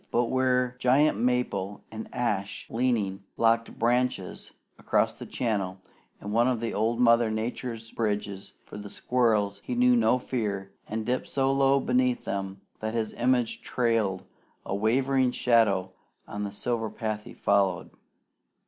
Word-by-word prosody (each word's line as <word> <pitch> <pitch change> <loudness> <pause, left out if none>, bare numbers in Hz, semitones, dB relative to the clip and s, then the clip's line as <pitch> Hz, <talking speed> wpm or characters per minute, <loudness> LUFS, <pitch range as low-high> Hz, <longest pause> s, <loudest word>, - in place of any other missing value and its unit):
But 120 0 +1
where 125 -1 +2
giant 130 -2 +3
maple 115 -5 -1
and 110 0 -7
ash, 105 -5 -2
leaning, 110 -5 0 0.2
locked 115 0 +2
branches 120 -4 0 0.3
across - - +1
the - - -10
channel 100 -6 -2 0.4
in 100 - -6
one 120 +3 +3
of 120 -3 0
old 115 +2 0
Mother 115 -1 +5
Nature's 115 +1 -4
bridges 105 -3 -3
for 105 - -9
the 100 0 -8
squirrels, 105 -5 +1
he - - -3
knew 250 0 +5
no 230 - +4
fear, 105 -6 -3 0.2
and 110 0 -3
dipped 125 +2 -1
so 135 -1 +1
low 135 0 +4
beneath 125 -1 +1
them 95 0 -4 0.2
that 110 +1 -3
his 110 -2 -1
image 125 -1 +1
trailed 115 -6 0 0.4
a - - -3
wavering 130 +5 +2
shadow 110 -7 +2 0.4
on 105 0 -4
the 100 - -5
silver 115 +2 -2
path 110 -2 -4
he - - -10
followed. 100 -3 +1
115 Hz, 145 wpm, -27 LUFS, 105-125 Hz, 0.4 s, Mother